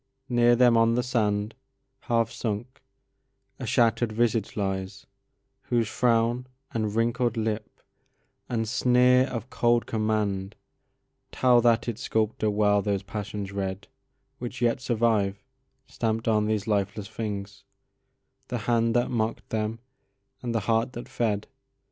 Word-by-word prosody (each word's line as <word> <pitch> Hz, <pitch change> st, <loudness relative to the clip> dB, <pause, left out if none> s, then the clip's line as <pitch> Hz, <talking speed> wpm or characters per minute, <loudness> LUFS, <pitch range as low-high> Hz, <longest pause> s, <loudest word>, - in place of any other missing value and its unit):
Near 120 Hz, -1 st, +4 dB
them 120 Hz, -1 st, +5 dB
on 115 Hz, 0 st, +4 dB
the 125 Hz, -, +1 dB
sand, 105 Hz, -3 st, 0 dB, 0.5 s
Half 115 Hz, -3 st, 0 dB
sunk, 115 Hz, +3 st, -4 dB, 0.8 s
a -, -, -5 dB
shatter'd 115 Hz, 0 st, +2 dB
visage 115 Hz, -1 st, 0 dB
lies, 95 Hz, -1 st, -3 dB, 0.6 s
whose 120 Hz, -2 st, +1 dB
frownAnd 120 Hz, +1 st, +1 dB, 0.3 s
wrinkled 115 Hz, +2 st, 0 dB
lip 110 Hz, -1 st, -3 dB, 0.7 s
and 115 Hz, -2 st, -1 dB
sneer 125 Hz, +2 st, +4 dB
of 125 Hz, 0 st, -6 dB
cold 120 Hz, 0 st, +2 dB
commandTell 110 Hz, +3 st, -1 dB
that 115 Hz, 0 st, +3 dB
its 120 Hz, 0 st, -4 dB
sculptor 110 Hz, -1 st, 0 dB
well 105 Hz, -1 st, +3 dB
those 100 Hz, -1 st, -1 dB
passions 105 Hz, -1 st, -5 dB
readWhich 130 Hz, +7 st, -7 dB
yet 120 Hz, +1 st, +1 dB
survive, 110 Hz, -5 st, +1 dB, 0.4 s
stamp'd 115 Hz, 0 st, -2 dB
on 105 Hz, -1 st, +2 dB
these 105 Hz, -2 st, 0 dB
lifeless 105 Hz, -1 st, -1 dB
things, 100 Hz, -2 st, -5 dB, 0.8 s
The 125 Hz, -, -2 dB
hand 115 Hz, -1 st, +2 dB
that 120 Hz, -, +2 dB
mock'd 115 Hz, -2 st, -2 dB
them 110 Hz, 0 st, -2 dB, 0.6 s
and 120 Hz, -2 st, -3 dB
the 115 Hz, -, +1 dB
heart 115 Hz, +4 st, +1 dB
that 120 Hz, -, -7 dB
fed. 105 Hz, -3 st, -1 dB
115 Hz, 120 wpm, -26 LUFS, 105-120 Hz, 0.8 s, them